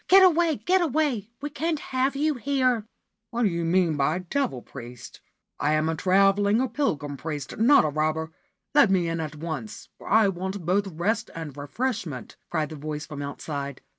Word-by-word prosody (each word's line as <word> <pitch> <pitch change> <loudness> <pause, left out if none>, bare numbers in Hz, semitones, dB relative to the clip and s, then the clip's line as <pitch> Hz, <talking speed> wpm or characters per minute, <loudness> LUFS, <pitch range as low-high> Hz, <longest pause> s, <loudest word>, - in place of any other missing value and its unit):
' - - -45
Get 385 +1 +8
away, 340 -3 +4
get 370 +6 +2
away! 285 - 0
We 290 +1 -4
can't 315 +2 -1
have 265 0 -1
you 300 +2 +1
here/ 255 -4 0 0.2
' 220 0 -56
What 240 +1 -1
do 210 - +4
you 170 -1 -2
mean 165 -2 +2
by 145 +5 +2
c< 185 - -7
Devil 205 - -1
Priest 120 -2 -10 0.2
"? - - -57
I 150 +1 +2
am 155 +1 +2
a 160 - +1
travelling 195 +4 +3
or 260 - +1
pilgrim 150 - -1
priest, 145 0 -5
not 265 - +6
a - - +1
robber. 155 +2 -1 0.4
Let 290 -7 +6
me 185 -3 +2
in 165 0 -2
at 155 -1 -4
once, 150 -9 -6
for - - -12
I 220 0 +5
want 190 0 -4
both 195 +3 +2
rest 205 +7 -1
and 160 -4 -6
refreshment/ 155 - -4
cried 155 -3 -1
the 155 - -8
voice 150 +1 -5
from 150 -2 -7
outside. 140 -1 -5
185 Hz, 200 wpm, -26 LUFS, 155-255 Hz, 0.4 s, Get